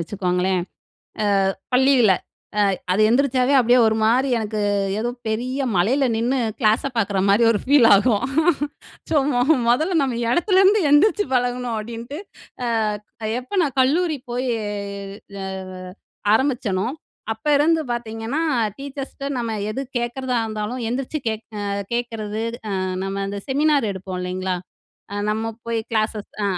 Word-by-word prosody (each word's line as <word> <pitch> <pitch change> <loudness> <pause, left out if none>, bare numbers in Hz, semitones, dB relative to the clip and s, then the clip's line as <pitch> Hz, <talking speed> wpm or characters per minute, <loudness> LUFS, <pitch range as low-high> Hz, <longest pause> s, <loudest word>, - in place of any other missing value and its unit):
வச்சுக்கோங்களேன், 180 0 0 0.9
அ - - -14 0.2
பள்ளியில. 255 -5 +5 0.6
அ - - -6 0.2
அது 190 - +1
எந்திரிச்சாவே 260 +1 +2
அப்டியே 245 +1 +4
ஒரு 220 0 +2
மாரி 245 +5 +3
எனக்கு 215 -1 -3 0.4
ஏதோ 240 +2 -1 0.2
பெரிய 255 +5 -1
மலையில 250 +9 +2
நின்னு 245 +4 +1 0.2
க்ளாஸ 220 -2 +3
பார்க்குற 200 -3 +1
மாரி 205 +4 +5
ஒரு 205 - -1
ஃபீல் 270 -4 +6
ஆகும். 205 +1 +3 0.9
ஸோ - - +1 0.6
முதல்ல 320 +7 +2
நம்ம 255 -4 -1
இடத்துலேருந்து 385 +4 +4
எந்திரிச்சு 410 +8 +4
பழகணும் 245 -1 0
அப்டின்ட்டு. 235 +6 -6 0.5
அ 215 -1 -2
எப்ப 260 +11 -6
நான் 280 -4 -2
கல்லூரி 310 +3 +2
போயி 250 +1 -1 1.0
அ - - -4 0.9
ஆரம்பிச்சனோ, 235 -7 0 0.5
அப்ப 220 +6 -13
இருந்து 320 +3 +3
பாத்தீங்கன்னா 230 +4 -3 0.4
டீச்சர்ஸ்கிட்ட 275 0 -6
நம்ம 230 -2 -2 0.2
எது 265 - -3 0.2
கேட்கறதா 250 +1 -2
இருந்தாலும் 215 +3 -4
எந்திரிச்சுகே 250 -2 -2 0.6
கேட்கறது, 225 -2 -3 0.2
அ - - -3 0.3
நம்ம 195 0 -3
அந்த 200 0 -4
செமினார் 285 -3 +2
எடுப்போம் 190 -1 -6
இல்லைங்களா? 185 0 -2 0.6
அ - - -4
நம்ம 220 +1 -1 0.2
போய் 230 -1 -1
க்ளாஸஸ் 215 -2 -1
அ - - +1
235 Hz, 125 wpm, -22 LUFS, 215-270 Hz, 1.0 s, ஃபீல்